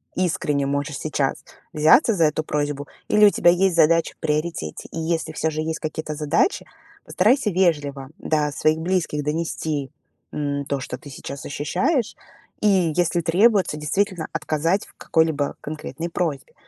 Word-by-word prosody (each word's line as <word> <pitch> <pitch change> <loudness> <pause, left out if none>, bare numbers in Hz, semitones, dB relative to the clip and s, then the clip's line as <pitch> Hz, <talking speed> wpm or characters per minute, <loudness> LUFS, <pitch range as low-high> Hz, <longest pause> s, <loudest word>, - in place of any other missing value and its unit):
искренне 150 -6 0
можешь 140 0 -2
сейчас 145 -3 -1 0.3
взяться 155 - +5
за 170 -5 +3
эту 155 +1 0
просьбу 145 -1 -2 0.2
или 210 0 +5
у - - +8
тебя 175 - +3
есть 180 0 +2
задача 165 0 +3
в - - -51
приоритете. 150 - -2
И 165 - -5
если 160 0 -1
всё 160 +1 0
же 155 0 -3
есть 160 0 -3
какие-то 155 -1 -4
задачи, 155 - +1 0.4
постарайся 225 +5 +2
вежливо 145 -7 0
до 150 -2 0
своих 155 +2 +1
близких 165 -3 -1
донести, 150 -2 -2 0.4
м, 140 -1 -2
то, 140 -1 -2
что 125 -1 -6
ты 145 - -12
сейчас 140 +1 -8
ощущаешь 185 - -1 0.5
и, 190 -6 +3
если 175 -1 +1
требуется, 190 +2 +3
действительно 175 +3 -1
отказать 165 +6 0
в - - -20
какой-либо 160 -3 +1
конкретной 155 +2 -6
просьбе. 165 -6 -3
155 Hz, 150 wpm, -23 LUFS, 145-175 Hz, 0.5 s, у